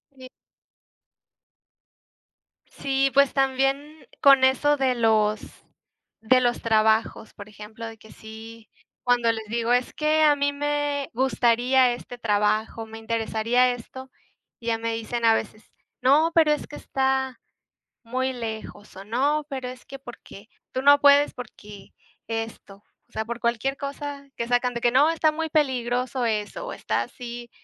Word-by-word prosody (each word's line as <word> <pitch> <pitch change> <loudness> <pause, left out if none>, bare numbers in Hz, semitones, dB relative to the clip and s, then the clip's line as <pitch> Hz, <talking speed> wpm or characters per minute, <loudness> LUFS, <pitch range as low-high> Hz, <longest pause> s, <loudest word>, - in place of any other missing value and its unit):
Sí. 260 -1 -12 2.4
Sí, 270 0 -1
pues 280 0 +4
también 270 +3 -1
con 275 -2 +6
eso 290 +3 +3
de 260 -2 +1
los 215 -2 +2 0.8
de 255 +3 +4
los 240 -1 0
trabajos, 220 0 +1
por 205 - -11
ejemplo, 215 +2 -10
de 225 0 -8
que 220 0 -17
sí 220 +1 -12 0.3
cuando 240 -2 +3
les 220 -1 -6
digo, 235 +2 -1
"Es 245 0 +1
que 310 +1 +2
a 295 -1 +5
mí 285 0 0
me 290 -1 -2
gustaría 250 0 +2
este 245 0 -9
trabajo, 215 0 0
me 225 0 -11
interesaría 230 +2 +1
esto", 260 +2 -9 0.5
y 235 - -11
ya 225 -1 +1
me 230 0 -2
dicen 230 +1 -4
a 225 -1 +6
veces: 215 -1 -6 0.3
"No, 300 +6 +4
pero 315 -2 +5
es 300 - -1
que 295 - -10
está 265 -1 -1 0.6
muy 255 +2 -2
lejos 220 -4 -7
o 195 - -9
no, 285 +7 0
pero 260 -2 -5
es 250 -1 -11
que 275 - -9
porque 235 -4 -13 0.2
tú 260 - -1
no 285 0 +7
puedes 285 0 +5
porque 210 -4 -12 0.3
esto", 225 -3 -6 0.3
o - - -33
sea, 220 - -3
por 235 +1 -5
cualquier 240 +4 -1
cosa 280 0 -6
que 235 - -4
sacan 245 0 +1
de 235 - -3
que 240 - +3
"No, 280 +5 +4
está 320 -1 +2
muy 320 +1 -4
peligroso 255 -3 0
eso, 230 - -3
está - - -2
así 240 -1 -9
245 Hz, 150 wpm, -24 LUFS, 225-275 Hz, 2.4 s, no